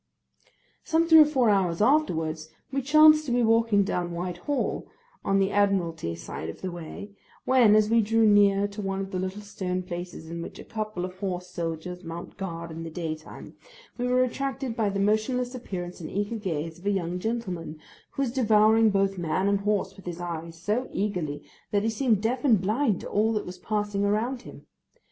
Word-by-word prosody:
Some 330 +1 +2
three 320 -1 +8
or 305 - +9
four 260 -7 +3
hours 180 -4 +1
afterwards, 165 - +1 0.2
we 275 0 0
chanced 305 +2 +6
to - - -1
be 245 0 +2
walking 225 -2 +4
down 175 -2 -2
Whitehall, 180 +11 -3 0.4
on 195 0 +2
the 195 0 +2
Admiralty 175 - +1
side 80 -1 -6
of 80 - -9
the 185 - -3
way, 175 +4 -8 0.3
when, 245 -5 +5
as 215 -1 +4
we 230 +1 +4
drew 225 +1 +3
near 205 -1 +5
to 205 +1 -7
one 195 -1 -2
of 195 0 -4
the 185 - -2
little 190 +3 -4
stone 185 -2 -3
places 175 -2 -7
in 170 +1 -5
which - - -8
a - - -9
couple 215 -4 -4
of 185 0 -9
horse 180 -2 -3
soldiers 175 +1 -5
mount 170 +1 -7
guard 170 -3 -5
in 160 +1 -7
the 165 - -5
daytime, 155 -1 -6 0.5
we 245 - 0
were 250 0 +3
attracted 265 -1 -3
by 215 -2 +1
the 195 0 -2
motionless 220 +5 +1
appearance 180 -8 -6
and 155 - -6
eager 205 +3 -2
gaze 165 -5 -4
of 195 - -7
a - - +4
young 180 -3 -1
gentleman, 185 -8 -4 0.4
who 275 - -1
was 250 - -1
devouring 220 -2 +4
both 195 -1 +1
man 175 +3 0
and 200 0 +2
horse 205 0 -1
with 195 - -14
his 175 -1 -5
eyes, 165 -1 -6
so 215 +9 -1
eagerly, 170 -8 -2 0.3
that 205 -2 +1
he 225 - +1
seemed 220 -3 +1
deaf 245 +3 0
and 235 -8 +5
blind 215 +3 0
to - - -7
all 220 +2 +1
that 210 - -2
was 180 0 -8
passing 205 0 -1
around 225 +5 0
him. - - -12
200 Hz, 200 wpm, -26 LUFS, 175-225 Hz, 0.5 s, or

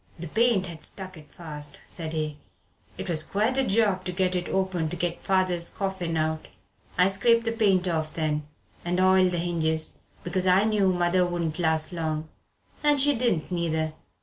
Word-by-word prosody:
"The 170 +1 -6
paint 220 +1 +2
had 165 -3 -7
stuck 190 -1 -5
it 150 -2 -14
fast," 150 -3 -6
said 160 -2 -5
he, 155 -2 -3 0.6
"it - - -5
was 160 -3 +2
quite 215 +9 0
a - - +3
job 200 -4 +2
to 180 - -2
get 185 0 0
it 180 -1 -2
open 185 -4 0
to 180 - -4
get 175 0 -2
father's 185 -3 +1
coffin 190 -4 -3
out. 155 0 -1 0.5
I 180 - +5
scraped 230 +4 +3
the 230 - +1
paint 195 -5 +2
off 160 -2 -2
then, 150 -2 -1 0.4
and 175 +1 -1
oiled 185 0 +5
the 175 - -2
hinges, 160 -2 0 0.2
because 185 +1 -1
I 185 +2 +5
knew 210 -3 +3
mother 180 0 +2
wouldn't 175 -2 -2
last 160 0 +1
long. 160 -2 -3 0.5
And 295 -1 +4
she 290 +2 +4
didn't 230 -10 0
neither." 160 -3 -1
175 Hz, 180 wpm, -26 LUFS, 160-190 Hz, 0.6 s, I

